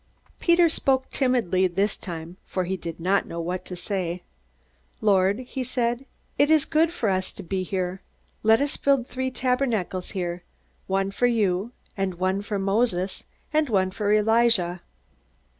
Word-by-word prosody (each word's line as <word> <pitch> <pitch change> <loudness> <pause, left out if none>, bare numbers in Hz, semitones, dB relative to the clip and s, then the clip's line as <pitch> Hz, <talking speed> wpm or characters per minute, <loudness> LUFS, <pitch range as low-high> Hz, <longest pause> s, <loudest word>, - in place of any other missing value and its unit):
Peter 340 0 +5
spoke 265 -4 +1
timidly 230 -9 +2
this 195 +3 0
time, 170 0 -7
for 185 - -2
he 185 +2 -2
did 170 -2 -7
not 190 +4 +1
know 170 - -5
what 175 +2 -3
to 180 - -7
say. 180 -1 -3 0.8
"Lord," 200 +1 +3
he 255 +1 -5
said, 245 +1 -1 0.3
"it 290 - +5
is 315 -2 +5
good 325 +1 +2
for 250 -10 -2
us 185 -1 0
to - - -9
be 185 +2 -2
here. 185 0 -3 0.4
Let 220 +3 +5
us 285 0 0
build 275 -3 +2
three 260 +1 -3
tabernacles 250 -8 -1
here, 175 -1 -2 0.5
one 195 0 0
for 245 +5 +2
you, 210 -2 +1 0.2
and 195 -2 -1
one 185 +2 0
for 205 0 -3
Moses, 195 -1 0 0.3
and 305 -2 +2
one 190 -3 +2
for 205 +1 -1
Elijah." 215 -4 +3
200 Hz, 160 wpm, -25 LUFS, 185-245 Hz, 0.8 s, Peter